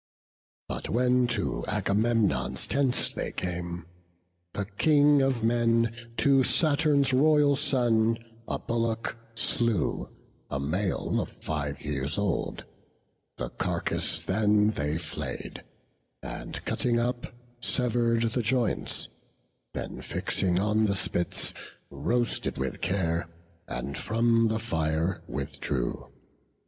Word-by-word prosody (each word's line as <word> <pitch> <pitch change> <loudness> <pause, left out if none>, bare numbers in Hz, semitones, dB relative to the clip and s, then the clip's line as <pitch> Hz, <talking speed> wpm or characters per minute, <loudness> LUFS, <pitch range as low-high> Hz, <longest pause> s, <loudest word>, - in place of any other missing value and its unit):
But - - -4
when 125 +1 +3
to 120 - 0
Agamemnon's 105 - +1
tents 135 -2 +2
they - - -4
came, 85 -2 -4 0.7
The 100 - -2
King 145 +7 +4
of 135 -4 +1
men 115 0 +2 0.2
to 140 -2 +4
Saturn's 145 -3 +3
royal 145 +1 +5
son 120 -6 +2 0.3
A - - -1
bullock 115 -1 -2 0.2
slew, 115 -3 +2 0.4
a 65 - -2
male 90 +7 -1
of - - -5
five 75 -2 -4
years 75 +2 -1
old; 100 -3 -1 0.7
The - - -3
carcase - - -1
then 105 +1 +3
they 75 -4 -2
flay'd; 80 -2 -5 0.6
and - - -6
cutting 120 -1 +1
up, 120 +1 -1 0.3
Sever'd 120 -2 +2
the 125 - 0
joints; 120 +1 0 0.7
then - - -5
fixing 90 -2 0
on 105 +3 +2
the 100 -2 +1
spits, 85 -2 0 0.4
Roasted 120 0 0
with 65 -1 -3
care, 85 -3 0 0.4
and 70 +1 -4
from 115 +1 +2
the 110 0 0
fire 80 -4 -1
withdrew. - - -3
115 Hz, 110 wpm, -28 LUFS, 90-125 Hz, 0.7 s, royal